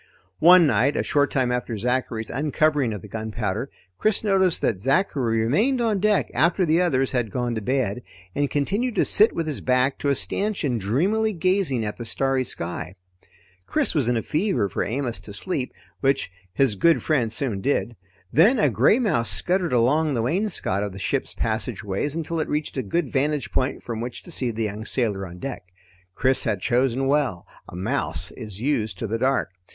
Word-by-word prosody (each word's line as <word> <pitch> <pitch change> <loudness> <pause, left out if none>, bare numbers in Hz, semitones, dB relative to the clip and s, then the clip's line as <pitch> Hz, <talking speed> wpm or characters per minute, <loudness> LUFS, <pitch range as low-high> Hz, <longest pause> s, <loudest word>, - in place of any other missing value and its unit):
One 175 +1 +8
night 140 0 +2
a - - +1
short 145 -1 +2
time 130 -2 0
after 125 -2 -2
Zachary's 120 -1 -2
uncovering 145 -1 +1
of 105 -4 -6
the - - -9
gunpowder, 110 +2 -3 0.3
Chris 215 0 +2
noticed 190 -4 +3
that 95 - +1
Zachary 130 - +1
remained 215 - +2
on 225 -4 +1
deck 210 +1 +1
after 175 +3 +2
the 165 +2 +3
others 135 -7 +1
had 120 -4 -1
gone 120 +2 -2
to 110 - -3
bed, 125 -1 -1 0.3
and 145 -1 0
continued 200 - -1
to - - +3
sit 215 +2 +6
with 165 - -3
his 150 -3 -3
back 130 +1 +1
to 145 - 0
a 140 - +3
stanchion 180 - -1
dreamily 190 - +1
gazing 175 - +1
at 105 - -4
the 120 - -6
starry 130 +4 0
sky. 90 -5 -4 0.7
Chris - - 0
was 145 -7 +1
in 120 -1 +2
a 115 - -2
fever 170 - 0
for 95 - -2
Amos 120 +2 -3
to 100 - -11
sleep, 135 - -3 0.3
which 135 -7 +1 0.2
his 125 +4 +2
good 165 - +3
friend 130 -8 +1
soon 110 -4 -2
did. 120 -3 0 0.4
Then 215 - +5
a 210 - +3
gray 215 - +4
mouse 155 - +1
scuttered 175 - 0
along 135 +5 +2
the 115 - 0
wainscot 170 - 0
of 100 -2 -3
the - - -9
ship's 95 - -2
passageways 110 +3 -2
until 165 0 -3
it 155 - -2
reached 150 0 -2
a 130 - -1
good 145 - -1
vantage 145 +1 0
point 130 +1 -1
from 115 -2 -4
which 120 0 -6
to 175 - -12
see 130 -6 -1
the 115 0 -3
young 105 0 -4
sailor 105 -6 -1
on 90 0 -11
deck. 135 +7 -5 0.5
Chris 130 0 +2
had 110 -5 -1
chosen 125 +5 +1
well; 135 -10 0 0.2
a - - -10
mouse 95 -2 -1
is 105 -5 -8
used 115 -4 -1
to - - -4
the 115 +1 -2
dark. 130 -5 +1
130 Hz, 190 wpm, -24 LUFS, 110-155 Hz, 0.7 s, One